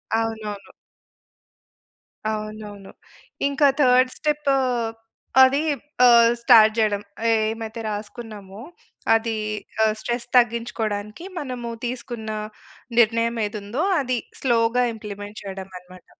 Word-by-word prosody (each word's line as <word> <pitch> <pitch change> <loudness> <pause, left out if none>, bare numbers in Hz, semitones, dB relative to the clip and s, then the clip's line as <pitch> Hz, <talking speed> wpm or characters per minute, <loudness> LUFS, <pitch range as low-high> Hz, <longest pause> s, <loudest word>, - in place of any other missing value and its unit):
అవునవును. 220 -3 -3 1.6
అవునవును. 215 -2 -7 0.6
ఇంకా 280 +1 +3
థర్డ్ 255 0 +5
స్టెప్పూ 295 -2 +1 0.9
అదీ 275 +3 +4 0.4
ఆహ్, 235 -1 +7
స్టార్ట్ 225 -3 +7
చెయడం, 210 -2 +1 0.3
ఏమైతే 220 +1 -1
రాసుకున్నామో, 210 -1 -7 0.5
అదీ 225 0 0 0.5
ఆహ్, 220 - +4
స్ట్రెస్ 240 +1 -3
తగ్గించుకోడానికి 225 - -1
మనము 250 -4 -5 0.2
తీసుకున్న 235 -2 -5 0.7
నిర్ణయం 230 +1 +3
ఏదుందో, 210 +6 -4 0.2
అది 255 -2 -1 0.2
స్లో‌గా 235 -1 +2
ఇంప్లిమెంట్ 205 -1 -8
చెయడం 195 -1 -7
అనమాట. 180 0 -16
225 Hz, 90 wpm, -23 LUFS, 210-240 Hz, 1.6 s, ఆహ్